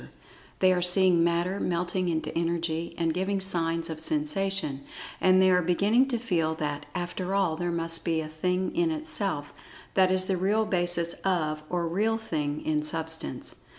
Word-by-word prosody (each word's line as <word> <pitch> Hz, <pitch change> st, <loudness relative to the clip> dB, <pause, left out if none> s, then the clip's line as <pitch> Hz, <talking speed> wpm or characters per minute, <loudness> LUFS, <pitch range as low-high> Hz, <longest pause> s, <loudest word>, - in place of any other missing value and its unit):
They 185 Hz, -1 st, +5 dB
are 180 Hz, -, 0 dB
seeing 180 Hz, -1 st, +4 dB
Matter 170 Hz, +3 st, 0 dB
melting 180 Hz, +1 st, -1 dB
into 160 Hz, -1 st, -2 dB
Energy, 170 Hz, 0 st, -2 dB
and 165 Hz, -1 st, 0 dB
giving 190 Hz, +3 st, -1 dB
signs 165 Hz, -3 st, +2 dB
of 160 Hz, -2 st, -6 dB
Sensation, 195 Hz, -, 0 dB, 0.4 s
and 185 Hz, 0 st, +5 dB
they 190 Hz, 0 st, +5 dB
are 180 Hz, 0 st, +4 dB
beginning 200 Hz, +9 st, +3 dB
to 250 Hz, -3 st, -1 dB
feel 170 Hz, -9 st, 0 dB
that, 150 Hz, -2 st, -4 dB
after 180 Hz, +1 st, -3 dB
all, 190 Hz, -5 st, +1 dB
there 175 Hz, +2 st, -2 dB
must 165 Hz, 0 st, -1 dB
be 165 Hz, -1 st, 0 dB
a 155 Hz, -, -4 dB
Thing 180 Hz, +4 st, -2 dB
in 340 Hz, 0 st, +2 dB
Itself, 205 Hz, -, 0 dB, 0.4 s
that 190 Hz, -1 st, +4 dB
is 185 Hz, 0 st, +1 dB
the 190 Hz, -1 st, 0 dB
real 205 Hz, +4 st, +1 dB
basis 175 Hz, -3 st, 0 dB
of, 155 Hz, -5 st, 0 dB
or 175 Hz, -1 st, -1 dB
"real 215 Hz, +6 st, +1 dB
thing" 150 Hz, -9 st, -3 dB
in 155 Hz, -1 st, +1 dB
Substance. 160 Hz, -, -4 dB
175 Hz, 170 wpm, -27 LUFS, 165-190 Hz, 0.4 s, They